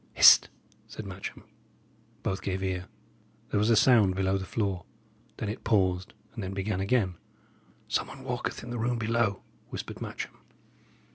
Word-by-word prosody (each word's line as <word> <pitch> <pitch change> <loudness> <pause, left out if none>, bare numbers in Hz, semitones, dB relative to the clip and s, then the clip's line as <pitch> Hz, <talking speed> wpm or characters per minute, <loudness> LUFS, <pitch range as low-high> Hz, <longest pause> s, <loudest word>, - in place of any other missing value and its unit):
"Hist!" - - +8 0.4
said 110 - -8
Matcham. 95 0 -7 0.8
Both 95 0 -1
gave 95 0 -2
ear. 90 -1 -2 0.6
There - - +2
was 105 +2 +3
a 115 - +6
sound 105 -5 +5
below 95 0 +1
the 95 -1 -3
floor; 100 -5 -1 0.5
then 110 - -3
it 105 +4 -5
paused, 95 -5 +1 0.2
and 110 - -5
then 95 +1 -4
began 95 0 -1
again. 100 -4 +1 0.7
"Some - - 0
one - - -10
walketh - - -3
in 120 - -7
the 120 - -3
room 120 +1 0
below," 115 -2 0 0.3
whispered - - -6
Matcham. - - -6
100 Hz, 155 wpm, -29 LUFS, 95-110 Hz, 0.8 s, Hist